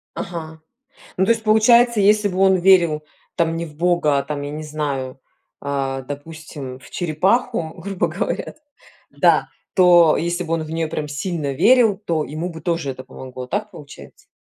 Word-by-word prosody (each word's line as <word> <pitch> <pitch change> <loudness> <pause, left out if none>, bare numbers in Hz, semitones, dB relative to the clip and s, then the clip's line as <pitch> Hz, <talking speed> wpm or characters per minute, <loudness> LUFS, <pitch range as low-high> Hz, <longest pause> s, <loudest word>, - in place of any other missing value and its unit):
Ага. 160 -2 -7 0.6
Ну, 190 - +2
то 230 - 0
есть, 225 -1 -4
получается, 235 +1 +5
если 210 +1 +4
бы 185 0 -4
он 190 -1 +5
верил, 175 -4 +4 0.3
там, 165 -1 +1
не 170 - -3
в 150 - -13
бога, 165 -5 +2
там, 145 -1 -5
я 145 - -5
не 155 +1 -6
знаю, 140 -4 -4 0.4
а, 135 -1 -3
допустим, 145 -2 -8
в - - -17
черепаху, 175 +2 0
грубо 190 +2 -2
говоря - - -3 0.6
да, - - +3 0.3
то 175 -3 +6
если 175 +2 -2
бы 165 0 -3
он 160 - -3
в 155 - -9
нее 165 -1 -1
прям 155 -1 -4
сильно 145 -1 -3
верил, 220 - +4
то 165 -7 -2
ему 160 +5 -5
бы 160 -1 -9
тоже 165 -4 -2
это 130 0 -9
помогло, 130 -1 -9
так 210 +7 -3
получается? 145 -5 -13
165 Hz, 170 wpm, -20 LUFS, 150-190 Hz, 0.6 s, то